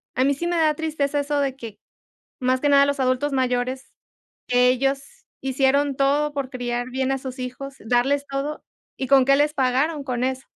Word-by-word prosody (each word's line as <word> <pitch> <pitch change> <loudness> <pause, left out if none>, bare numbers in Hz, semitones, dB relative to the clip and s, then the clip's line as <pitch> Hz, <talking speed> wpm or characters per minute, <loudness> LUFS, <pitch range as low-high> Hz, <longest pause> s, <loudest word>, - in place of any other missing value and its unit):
a 255 - +2
mí 280 +1 +3
sí 340 +5 -3
me 350 - 0
da 315 -2 +3
tristeza 295 -2 -1
eso 290 0 -1
de 270 -2 -2
que, 230 -5 -9 0.6
más 255 0 0
que 290 - +3
nada, 280 0 +6
los 285 -1 -1
adultos 255 +3 +1
mayores, 255 0 -1 0.6
ellos 250 +2 +3 0.4
hicieron 270 +1 +1
todo 285 +2 +1
por 280 -2 -3
criar 245 -1 -3
bien 265 +1 -1
a - - -1
sus 260 0 -8
hijos, 255 +2 -6
darles 250 +5 +1
todo, 275 +2 -3 0.4
y, 265 - -3
¿con 275 -1 +6
qué 275 +1 +4
les 295 +1 +2
pagaron?, 280 +3 0
con 250 -2 -2
eso. 260 0 -3
270 Hz, 185 wpm, -23 LUFS, 255-285 Hz, 0.6 s, nada